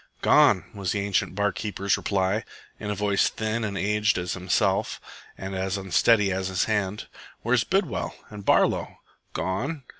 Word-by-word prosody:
"Gone," - - +5
was 100 -3 -2
the 100 - -1
ancient 100 -1 0
bar 100 0 +1
keeper's 100 -1 -1
reply, 100 +2 0 0.4
in 105 - -5
a 105 - -1
voice 100 0 +2
thin 110 +1 -2
and 100 -2 -3
aged 105 +1 +1
as 90 0 -2
himself, 90 -1 0 0.4
and 95 0 -6
as 95 +2 -1
unsteady 100 +2 +3
as 95 0 -1
his 95 -1 0
hand. 105 -2 -1 0.4
"Where's 120 0 +2
Bidwell 190 - -1 0.2
and 105 -1 -8
Barlow?" - - +2 0.4
"Gone." 110 - -2
100 Hz, 155 wpm, -25 LUFS, 95-110 Hz, 0.4 s, Gone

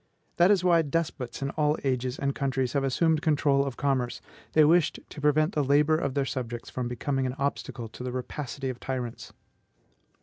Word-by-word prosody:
That 175 +2 +6
is 200 -3 +4
why 170 -2 +5
despots 145 -5 -3
in 135 - -2
all 150 0 +1
ages 130 -1 -1
and 140 0 -1
countries 135 -3 -1
have 140 - +1
assumed 155 +4 +2
control 145 -3 +3
of 135 -3 -5
commerce; 130 -4 0 0.3
they 155 -1 +6
wished 165 +1 +3
to 145 - -10
prevent 155 +3 +3
the 150 - +1
labor 145 +3 +4
of 140 -4 -2
their 140 -1 +1
subjects 120 -2 -5
from 125 -1 -3
becoming 130 +2 -1
an 125 - -4
obstacle 135 -4 -3
to 120 - -9
the 125 - -3
rapacity 130 +2 -4
of 125 -1 -5
tyrants. 125 -3 -5
140 Hz, 190 wpm, -27 LUFS, 130-150 Hz, 0.3 s, That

